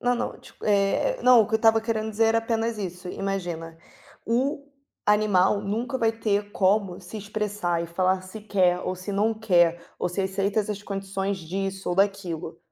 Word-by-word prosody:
Não, 245 Hz, 0 st, +2 dB
não. -, -, -3 dB
Tipo, -, -, -14 dB
eh, 205 Hz, -, +2 dB
não, 250 Hz, -2 st, +7 dB
o 210 Hz, -, +2 dB
que 220 Hz, -, -3 dB
eu -, -, +7 dB
estava 225 Hz, 0 st, +4 dB
querendo 220 Hz, -1 st, -2 dB
dizer 225 Hz, +1 st, +2 dB
era 225 Hz, 0 st, +3 dB
apenas 225 Hz, -1 st, -1 dB
isso, 180 Hz, -2 st, -5 dB
imagina: 175 Hz, -5 st, -4 dB, 0.5 s
o 275 Hz, +5 st, 0 dB, 0.4 s
animal 205 Hz, -2 st, +3 dB
nunca 230 Hz, +5 st, -2 dB
vai 225 Hz, -1 st, +2 dB
ter 205 Hz, -2 st, -1 dB
como 195 Hz, -1 st, +1 dB
se 185 Hz, +4 st, -9 dB
expressar 205 Hz, -5 st, -2 dB
e -, -, -4 dB
falar 185 Hz, +2 st, +1 dB
se 185 Hz, +4 st, -9 dB
quer 185 Hz, -4 st, +2 dB
ou 185 Hz, -, -2 dB
se 185 Hz, +3 st, -6 dB
não 210 Hz, +3 st, +2 dB
quer, 175 Hz, -6 st, +3 dB, 0.2 s
ou -, -, 0 dB
se 180 Hz, +3 st, -3 dB
aceita 195 Hz, +2 st, 0 dB
essas 205 Hz, 0 st, -4 dB
condições 195 Hz, 0 st, -3 dB
disso 190 Hz, +3 st, -4 dB
ou -, -, 0 dB
daquilo. 195 Hz, -5 st, -1 dB
200 Hz, 185 wpm, -25 LUFS, 185-220 Hz, 0.5 s, não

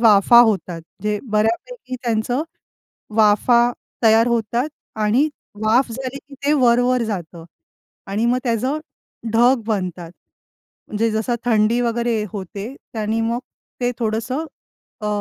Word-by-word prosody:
वाफा 225 Hz, +1 st, +6 dB
होतात. 190 Hz, -7 st, +1 dB, 0.2 s
जे 210 Hz, 0 st, 0 dB
बऱ्यापैकी 235 Hz, -, -1 dB
त्यांचं 240 Hz, +4 st, 0 dB, 0.7 s
वाफा 235 Hz, +3 st, +4 dB, 0.3 s
तयार 225 Hz, +1 st, +5 dB
होतात 235 Hz, +4 st, 0 dB, 0.3 s
आणि 230 Hz, +8 st, +3 dB, 0.4 s
वाफ 235 Hz, +3 st, +3 dB
झाले 260 Hz, +2 st, -5 dB
की 285 Hz, 0 st, -16 dB
ते 295 Hz, -, +4 dB
वर-वर 245 Hz, -2 st, +3 dB
जातं. 175 Hz, -6 st, -5 dB, 0.6 s
आणि 205 Hz, +4 st, -1 dB
मग 245 Hz, +1 st, +2 dB
त्याचं 255 Hz, +5 st, 0 dB, 0.5 s
ढग 240 Hz, +2 st, +4 dB
बनतात. 180 Hz, -5 st, -3 dB, 0.8 s
म्हणजे 225 Hz, +2 st, 0 dB
जसं 220 Hz, +3 st, 0 dB
थंडी 225 Hz, 0 st, +3 dB
वगैरे 235 Hz, -2 st, 0 dB
होते. 200 Hz, +5 st, -6 dB, 0.2 s
त्यानी 220 Hz, 0 st, -1 dB
मग 230 Hz, +1 st, 0 dB, 0.4 s
ते 245 Hz, 0 st, +1 dB
थोडंसं 230 Hz, +7 st, -1 dB, 0.6 s
अ, 210 Hz, -, -2 dB
230 Hz, 120 wpm, -20 LUFS, 215-245 Hz, 0.8 s, वाफा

